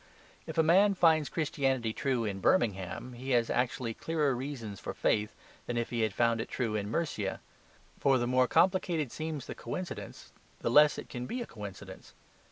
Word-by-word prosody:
If - - -6
a 160 - +5
man 195 +5 +5
finds 160 -4 +4
Christianity 135 -7 0
true 125 -3 0
in 100 -2 -3
Birmingham, 95 +3 0
he 130 +3 -7
has 115 -1 0
actually 125 -1 -1
clearer 150 -1 0
reasons 120 -7 -5
for - - -6
faith 105 0 0 0.3
than 120 - -2
if 120 - -2
he 120 -1 -1
had 110 -1 +1
found 115 +2 +2
it - - -6
true 115 -4 -2
in 100 -1 -2
Mercia. 115 -8 -2 0.6
For 135 -1 +4
the 120 - 0
more 125 +1 +3
complicated 175 -7 +2
seems 155 -4 -4
the - - -6
coincidence, 180 -2 -7 0.3
the 115 - 0
less 150 +3 +6
it - - -7
can 125 -1 -6
be 250 - -3
a - - -8
coincidence. 105 - -10
125 Hz, 180 wpm, -31 LUFS, 115-155 Hz, 0.6 s, less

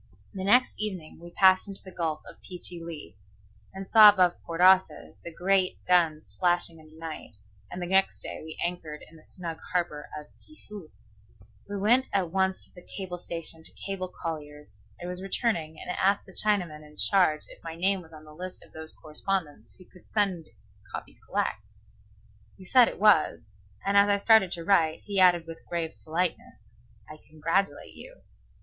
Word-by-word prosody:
The 190 - -5
next 245 +6 +4
evening 185 -8 -5
we 170 - -10
passed 185 +2 +4
into 195 -1 -9
the 190 - -11
Gulf 160 -3 -2
of - - -13
Pe 180 - -8
chi 175 -1 -5
li, 160 - -8 0.6
and 195 0 -7
saw 215 -2 +11
above 185 -4 +3
Port 165 0 -6
Arthur 185 +1 +4
the 170 - -7
great 185 +2 +1
guns 165 -4 +2
flashing 175 -2 +1
in 155 - -16
the 155 - -18
night, 160 -8 -8 0.3
and 180 - -7
the 175 - -3
next 190 +2 +2
day - - -7
we 160 0 -8
anchored 165 -4 -5
in 165 - -18
the 155 - -17
snug 170 -3 -7
harbor 170 -5 -2
of 150 - -8 0.2
Chefoo. 210 - -12 0.8
I 205 - -4
went 235 +7 +3
at 185 -4 0
once 190 0 0
to - - -26
the 180 - -13 0.2
cable 180 -3 -5
station 165 -1 -5
to - - -9
cable 195 -2 -3
Collier's 150 - -8 0.2
I 175 - -7
was 180 +1 -5
returning, 190 -6 -2
and - - -5
asked 195 +2 +1
the 190 - -14
Chinaman 180 -9 0
in 150 0 -17
charge 180 -6 +3
if - - -14
my 165 -1 -6
name 190 +3 +1
was 165 -2 -17
on 155 -1 -13
his 150 0 -14
list 185 0 -7
of - - -25
those 160 0 -7
correspondents 155 - -4
who 185 - -16
could 180 - -20
send 190 -6 0 0.4
copy - - -8
collect. 105 +1 -2 0.8
He 185 - -13
said 250 +4 +6
it - - -6
was; 155 - +3 0.3
and 200 - +1
as 200 0 +6
I 200 - +4
started 200 -2 +5
to 170 - -4
write, 165 -5 +3
he 200 -2 -2
added 175 -2 +5
with 165 0 -10
grave 165 -2 -2
politeness, 170 +2 -2 0.5
"I 155 - -11
congratulate 165 +6 -1
you." - - -12
180 Hz, 185 wpm, -27 LUFS, 160-195 Hz, 0.8 s, saw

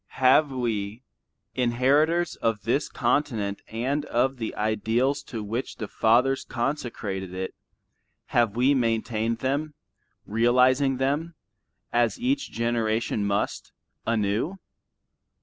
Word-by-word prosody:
Have 135 +3 +5
we, 115 -3 -2 0.5
inheritors 140 +8 +2
of 115 -2 -1
this 135 +6 0
continent 105 -9 0
and 130 +6 -1
of 130 0 +1
the 115 -2 -4
ideals 110 +6 0
to 115 -6 -5
which 115 +5 -4
the 110 - -5
fathers 125 +6 +2
consecrated 110 -7 -3
it, 95 0 -4 0.8
have 115 -3 +3
we 130 +4 +4
maintained 115 -2 0
them, 145 +3 -1 0.5
realizing 125 +4 +3
them, 145 +6 -1 0.6
as 120 -1 +2
each 275 +3 0
generation 115 -2 0
must, 100 +1 -2 0.3
anew? 115 - 0
120 Hz, 105 wpm, -26 LUFS, 110-135 Hz, 0.8 s, Have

